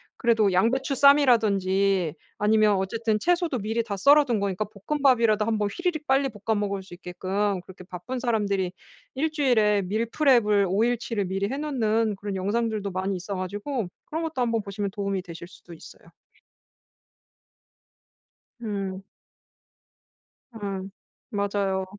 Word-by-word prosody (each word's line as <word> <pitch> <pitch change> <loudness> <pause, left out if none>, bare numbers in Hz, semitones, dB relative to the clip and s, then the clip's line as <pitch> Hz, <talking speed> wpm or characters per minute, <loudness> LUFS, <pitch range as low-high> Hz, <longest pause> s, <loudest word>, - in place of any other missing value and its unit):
그래도 220 -5 +2
양배추 260 +8 +1
쌈이라든지 200 - +3 0.2
아니면 215 0 +3
어쨌든 215 +3 -1
채소도 345 - +1
미리 225 +3 -1
다 200 -3 -5
썰어둔 280 -1 +4
거니까 200 0 -1 0.2
볶음밥이라도 240 -7 +3
한 225 -1 0
번 205 -1 0
휘리릭 345 -4 -2
빨리 270 +1 +2
볶아 215 +1 -2
먹을 200 -2 -2
수 185 - -14
있게끔 190 +2 -2
그렇게 190 -1 -12
바쁜 185 +9 -6
사람들이 200 -6 0 0.4
1 310 +3 0
주일에 220 -9 +2
밀프렙을 215 0 +2
5 200 +4 +2
일치를 230 -4 -1
미리 195 +2 -2
해 270 - -3
놓는 225 -7 0
그런 200 0 -5
영상들도 210 0 -1
많이 190 +1 -2
있어 190 +3 -5
가지고 205 +4 -4 0.2
그런 330 -1 -4
것도 310 -6 -3
한번 230 -2 +1
보시면 200 0 -4
도움이 195 -2 -3
되실 170 -1 -9
수도 175 -1 -15
있어요. 160 - -14 2.5
음. 195 -3 -4 1.5
음. 195 -2 -5 0.4
맞아요. 200 -2 -1
210 Hz, 305 characters per minute, -25 LUFS, 195-240 Hz, 2.5 s, 썰어둔